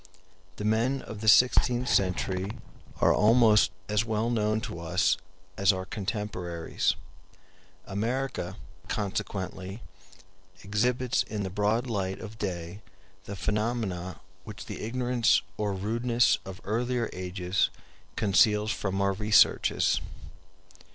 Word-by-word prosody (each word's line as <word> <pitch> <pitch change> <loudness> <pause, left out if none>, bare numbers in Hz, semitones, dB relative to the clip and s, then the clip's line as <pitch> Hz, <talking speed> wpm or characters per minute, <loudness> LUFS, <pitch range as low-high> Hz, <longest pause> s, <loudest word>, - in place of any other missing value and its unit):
The 105 - -5
men 115 +5 +1
of 105 -2 -8
the 110 - -4
sixteenth 125 +2 +5
century 95 +1 0 0.5
are - - +5
almost 110 -1 +5 0.2
as 105 +1 +1
well 110 +1 -1
known 110 -1 +1
to 85 - -6
us 90 +3 +2 0.4
as 100 0 +5
our 95 -1 -4
contemporaries. 95 -4 -2 0.9
America, 110 -2 -3 0.3
consequently, 95 0 -4 0.8
exhibits 120 +5 +1
in 105 -2 -4
the 95 - -4
broad 105 +5 +1
light 95 -5 -2
of 110 0 -9
day 90 0 -4 0.4
the 100 - -6
phenomena 105 -4 -2 0.2
which 105 0 -9
the - - -7
ignorance 120 +1 +2
or 105 0 -1
rudeness 115 +5 +1
of 95 -1 -8
earlier 120 +3 -1
ages 90 +1 -1 0.5
conceals 105 +1 +3
from 100 -4 -2
our 100 0 +2
researches. 105 +1 +3
105 Hz, 110 wpm, -28 LUFS, 95-115 Hz, 0.9 s, sixteenth